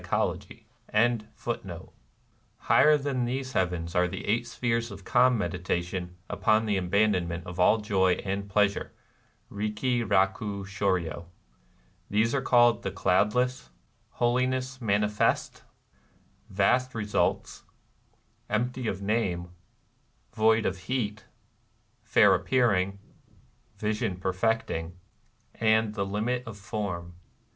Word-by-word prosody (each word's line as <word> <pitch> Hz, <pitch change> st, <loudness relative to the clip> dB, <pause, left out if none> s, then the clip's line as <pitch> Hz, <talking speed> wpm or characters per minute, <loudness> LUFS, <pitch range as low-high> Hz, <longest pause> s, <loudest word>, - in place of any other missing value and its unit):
^ 110 Hz, -5 st, -3 dB, 0.7 s
Higher 150 Hz, 0 st, +5 dB
than 135 Hz, -3 st, -1 dB
these 130 Hz, +1 st, -3 dB
heavens 90 Hz, -2 st, -1 dB
are 90 Hz, -1 st, +3 dB
the 95 Hz, +2 st, -6 dB
eight 120 Hz, +3 st, 0 dB
spheres 115 Hz, -1 st, -1 dB
of 100 Hz, -2 st, -10 dB
Calm 125 Hz, 0 st, +4 dB
Medi 100 Hz, -3 st, -2 dB
tation 90 Hz, 0 st, -3 dB
upon 110 Hz, +1 st, +2 dB
the 105 Hz, -2 st, 0 dB
Abandonment 90 Hz, -3 st, +1 dB
of 90 Hz, +1 st, -8 dB
all 100 Hz, +5 st, +5 dB
Joy 95 Hz, -4 st, +2 dB
and 100 Hz, +1 st, -3 dB
Pleasure 100 Hz, 0 st, +1 dB, 0.6 s
(^Itiki 105 Hz, +4 st, -1 dB
rahu 100 Hz, +1 st, +1 dB
slidryo). 90 Hz, -5 st, -1 dB, 0.8 s
They 105 Hz, +2 st, +3 dB
are 135 Hz, -, +1 dB
called 120 Hz, -2 st, +4 dB
The -, -, -3 dB
Cloudless, 105 Hz, -, +1 dB, 0.4 s
Holiness 130 Hz, +2 st, 0 dB
Manifest, 105 Hz, -1 st, 0 dB, 0.9 s
Vast 120 Hz, +6 st, +1 dB
Ee 110 Hz, -, -2 dB
sults, 105 Hz, -, -1 dB, 0.9 s
Empty 125 Hz, +3 st, -1 dB
of 100 Hz, -1 st, -3 dB
Name, 95 Hz, -5 st, -1 dB, 0.8 s
Void 110 Hz, +1 st, +3 dB
of 95 Hz, -, -1 dB
Heat, 110 Hz, -4 st, -2 dB, 0.8 s
Fair -, -, +5 dB
Appearing, 100 Hz, -7 st, +1 dB, 0.8 s
Vision 105 Hz, -1 st, -1 dB
Perfecting, 95 Hz, -3 st, -1 dB, 0.6 s
and 110 Hz, -1 st, +2 dB
The 100 Hz, -3 st, -2 dB
Limit 110 Hz, +5 st, -1 dB
of 110 Hz, -3 st, -8 dB
Form. 100 Hz, -5 st, -5 dB
105 Hz, 105 wpm, -27 LUFS, 95-120 Hz, 0.9 s, Higher